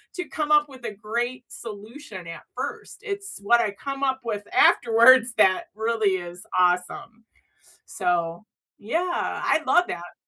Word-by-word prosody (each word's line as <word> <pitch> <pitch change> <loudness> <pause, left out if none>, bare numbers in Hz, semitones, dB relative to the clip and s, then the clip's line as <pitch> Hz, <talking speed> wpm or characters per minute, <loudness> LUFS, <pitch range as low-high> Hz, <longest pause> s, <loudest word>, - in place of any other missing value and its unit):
to 360 - -3
come 300 -1 -1
up 295 - +1
with 260 -2 -14
a 210 - -5
great 240 +2 -2 0.2
solution 215 0 -9
at - - -13
first. - - -6
It’s 395 0 -4 0.2
what 235 0 +5
I 215 - 0 0.2
come 275 0 -3
up 265 - -11
with 205 -1 -4 0.2
afterwards 235 +2 +5
that 190 -2 +4 0.2
really 220 -4 +2 0.2
is 175 - -13 0.3
awesome. 180 +5 -3 0.9
So - - +1 0.8
yeah, 350 +1 0 0.3
I - - +1
love 355 0 +5
that! 175 0 -6
235 Hz, 145 wpm, -24 LUFS, 205-280 Hz, 0.9 s, what